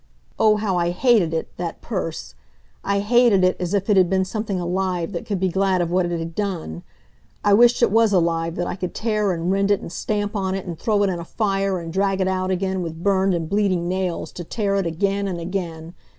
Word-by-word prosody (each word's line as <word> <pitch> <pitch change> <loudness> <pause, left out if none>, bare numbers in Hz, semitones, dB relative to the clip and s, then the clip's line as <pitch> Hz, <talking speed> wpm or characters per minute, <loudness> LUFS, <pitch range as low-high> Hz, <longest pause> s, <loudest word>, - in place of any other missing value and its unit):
Oh, 215 -1 +5
how 205 -4 -1
I 170 0 +1
hated 195 -2 +3
it, 165 0 -4
that 170 -2 -4
purse! 185 -7 -4 0.5
I 200 0 0
hated 230 -2 +4
it 185 0 +3
as 180 +2 -1
if 195 -1 -1
it 210 -3 +3
had 185 -2 +5
been 190 0 +1
something 205 -1 -3
alive 180 0 -1
that 170 - -5
could 200 -3 -1
be 190 0 +1
glad 190 0 +1
of 170 -1 -1
what 180 0 +2
it 175 0 -2
had 165 0 -5
done. 170 - -3 0.6
I 205 - +4
wished 240 +3 +5
it - - +4
was 225 0 +4
alive 165 -2 +1
that 175 - -2
I - - -3
could 180 -1 -5
tear 215 -3 0
and 170 +1 -1
rend 195 +1 +1
it 205 - +3
and - - -8
stamp 205 +3 -2
on 190 -2 -1
it 195 - -5
and 170 -3 -6
throw 210 0 +1
it 195 - +2
in 175 - -3
a - - -5
fire, 195 0 -1
and 165 -1 -7
drag 195 0 +1
it 190 - +1
out 185 0 -1
again, 190 0 -1
with 165 -1 -6
burned 195 -2 +2
and 165 -2 -3
bleeding 190 -3 +1
nails, 185 -1 -2
to 175 - -7
tear 200 +2 -1
it 195 -3 0
again 195 +4 -1
and 180 -3 -3
again. 170 -2 -5
190 Hz, 235 wpm, -22 LUFS, 175-200 Hz, 0.6 s, Oh